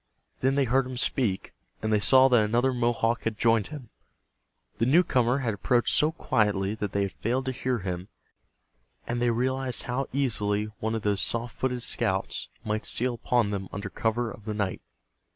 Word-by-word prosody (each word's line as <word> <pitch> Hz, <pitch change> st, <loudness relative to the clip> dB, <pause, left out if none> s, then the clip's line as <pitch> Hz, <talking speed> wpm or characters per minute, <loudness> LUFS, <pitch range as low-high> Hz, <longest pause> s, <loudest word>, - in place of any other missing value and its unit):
Then 135 Hz, +1 st, +1 dB
they 140 Hz, -, +3 dB
heard 130 Hz, +1 st, +2 dB
him 130 Hz, -1 st, -6 dB
speak, 120 Hz, -6 st, 0 dB, 0.3 s
and 110 Hz, 0 st, -1 dB
they 105 Hz, -, +4 dB
saw 130 Hz, +6 st, +6 dB
that 120 Hz, -4 st, +5 dB
another 120 Hz, +5 st, +1 dB
Mohawk 120 Hz, -1 st, +1 dB
had 110 Hz, -2 st, -3 dB
joined 115 Hz, -3 st, +3 dB
him. 145 Hz, -7 st, -9 dB, 0.9 s
The 115 Hz, -, +2 dB
newcomer 130 Hz, -5 st, +3 dB
had 115 Hz, -, 0 dB
approached 120 Hz, +4 st, +2 dB
so 155 Hz, +1 st, +4 dB
quietly 105 Hz, -9 st, 0 dB
that 105 Hz, -3 st, -4 dB
they 100 Hz, -, 0 dB
had 100 Hz, -, -2 dB
failed 125 Hz, +4 st, -2 dB
to 130 Hz, -, -1 dB
hear 130 Hz, 0 st, -1 dB
him, 90 Hz, -2 st, -4 dB, 1.0 s
and 120 Hz, 0 st, -2 dB
they 120 Hz, -, +3 dB
realized 130 Hz, +2 st, -1 dB
how 125 Hz, +2 st, -2 dB
easily 105 Hz, -6 st, 0 dB
one 110 Hz, +1 st, -1 dB
of 110 Hz, -, -4 dB
those 100 Hz, -2 st, +1 dB
soft 115 Hz, 0 st, 0 dB
footed 125 Hz, -2 st, -2 dB
scouts -, -, -1 dB, 0.2 s
might 110 Hz, +1 st, -2 dB
steal 125 Hz, +1 st, 0 dB
upon 120 Hz, -3 st, 0 dB
them 95 Hz, -2 st, -4 dB
under 100 Hz, -1 st, -6 dB
cover 115 Hz, +1 st, -1 dB
of 105 Hz, -, -12 dB
the 110 Hz, -1 st, -3 dB
night. 100 Hz, -3 st, -2 dB
115 Hz, 185 wpm, -27 LUFS, 105-130 Hz, 1.0 s, saw